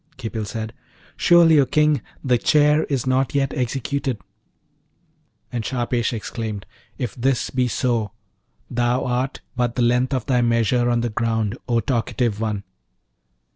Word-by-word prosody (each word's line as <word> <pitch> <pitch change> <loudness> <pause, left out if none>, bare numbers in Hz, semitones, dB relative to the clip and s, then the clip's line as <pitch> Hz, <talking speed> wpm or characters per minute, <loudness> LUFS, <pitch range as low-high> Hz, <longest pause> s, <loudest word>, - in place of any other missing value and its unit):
Khipil 110 -3 -4
said, 110 +1 -5 0.4
'Surely, 170 -3 +6
O 140 - +5
King, 150 -2 +3 0.2
the 125 -3 +2
chair 150 +2 +4
is 135 -4 -1
not 130 +1 +1
yet 135 -1 +1
executed.' 130 -1 -2 1.3
And 120 -3 -2
Shahpesh 120 -1 -1
exclaimed, 110 -2 -5 0.3
'If 120 -6 -3
this 130 +1 0
be 130 -1 +1
so, 115 -3 0 0.6
thou 120 +1 0
art 125 +1 -1
but 120 -1 0
the 125 - +1
length 125 +3 +2
of 125 -3 -2
thy 125 -3 +2
measure 120 +1 +2
on 120 -1 +2
the 120 - -1
ground, 110 -1 -1
O 115 -1 +2
talkative 115 -3 -1
one!' 105 -3 -2
120 Hz, 140 wpm, -22 LUFS, 115-130 Hz, 1.3 s, Surely